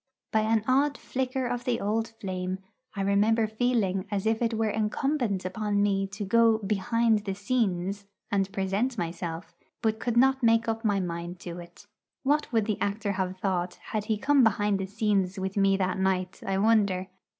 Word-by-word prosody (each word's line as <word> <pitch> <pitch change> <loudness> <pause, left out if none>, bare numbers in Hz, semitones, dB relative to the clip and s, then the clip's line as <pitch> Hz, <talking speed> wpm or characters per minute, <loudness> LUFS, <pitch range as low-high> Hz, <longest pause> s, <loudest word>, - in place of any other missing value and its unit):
By 220 - +3
an 220 0 +2
odd 280 +3 +3
flicker 260 0 -2
of 245 0 -2
the 240 -2 0
old 220 +3 0
flame, 185 -1 -3 0.4
I 195 - -2
remember 210 +3 +3
feeling 215 -4 0
as 205 -1 -2
if 220 +1 +1
it 230 -1 +1
were 220 -1 +1
incumbent 220 -1 -1
upon 205 +2 0
me 195 -1 +1
to 200 +1 -6
go 230 +2 +4
'behind 220 +2 +1
the 195 -2 -3
scenes' 200 -3 -1 0.2
and 195 -2 +1
present 200 +6 -1
myself, 170 -1 -4 0.3
but 220 -1 +1
could 235 0 -1
not 265 +2 +4
make 230 0 +3
up 225 0 -2
my 205 -3 +2
mind 175 0 -4
to 175 0 -6
it. 175 +3 -13 0.4
What 295 +2 +1
would 225 -3 +2
the 215 -2 -2
actor 205 0 -1
have 185 -1 -2
thought 185 -2 -1 0.2
had 215 -1 -1
he 215 -1 0
come 275 +4 +4
behind 205 -2 +2
the 190 - -3
scenes 200 -2 0
with 190 0 -3
me 195 -1 +3
that 185 0 -1
night, 185 -1 -1
I 195 0 +1
wonder! 200 -3 +3
205 Hz, 185 wpm, -27 LUFS, 190-225 Hz, 0.4 s, go